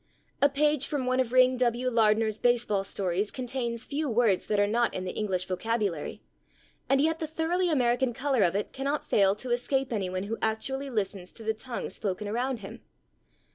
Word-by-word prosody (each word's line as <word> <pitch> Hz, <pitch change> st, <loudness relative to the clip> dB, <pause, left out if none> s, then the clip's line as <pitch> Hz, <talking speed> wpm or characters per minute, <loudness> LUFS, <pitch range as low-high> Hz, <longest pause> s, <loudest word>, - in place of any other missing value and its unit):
A 285 Hz, -, +6 dB
page 295 Hz, 0 st, +2 dB
from 280 Hz, -4 st, -2 dB
one 255 Hz, 0 st, +1 dB
of 250 Hz, -3 st, +1 dB
Ring 255 Hz, 0 st, +5 dB
W. 245 Hz, 0 st, +1 dB
Lardner's 220 Hz, -1 st, +2 dB
baseball 240 Hz, -5 st, +2 dB
stories 195 Hz, +1 st, -1 dB
contains 245 Hz, -2 st, -3 dB
few 295 Hz, 0 st, -2 dB
words 225 Hz, -5 st, +2 dB
that 210 Hz, -1 st, +1 dB
are 205 Hz, -, +5 dB
not 235 Hz, +3 st, +1 dB
in 185 Hz, -, -3 dB
the 180 Hz, -, -3 dB
English 190 Hz, -4 st, -1 dB
vocabulary, 200 Hz, -4 st, -2 dB, 0.7 s
and 270 Hz, 0 st, +4 dB
yet 320 Hz, +3 st, +2 dB
the 315 Hz, -, -3 dB
thoroughly 335 Hz, +3 st, 0 dB
American 250 Hz, -3 st, +2 dB
color 265 Hz, 0 st, 0 dB
of 180 Hz, -1 st, +3 dB
it 205 Hz, -, -2 dB
cannot 280 Hz, +2 st, -2 dB
fail 195 Hz, -1 st, +3 dB
to 245 Hz, +4 st, -5 dB
escape 255 Hz, +1 st, 0 dB
anyone 185 Hz, -3 st, -2 dB
who 220 Hz, +3 st, -4 dB
actually 265 Hz, +6 st, -1 dB
listens 195 Hz, -5 st, -3 dB
to 225 Hz, -, -11 dB
the 220 Hz, 0 st, 0 dB
tongue 235 Hz, +2 st, -5 dB
spoken 205 Hz, 0 st, -3 dB
around 240 Hz, +2 st, -2 dB
him. 195 Hz, -, -9 dB
235 Hz, 185 wpm, -28 LUFS, 210-265 Hz, 0.7 s, A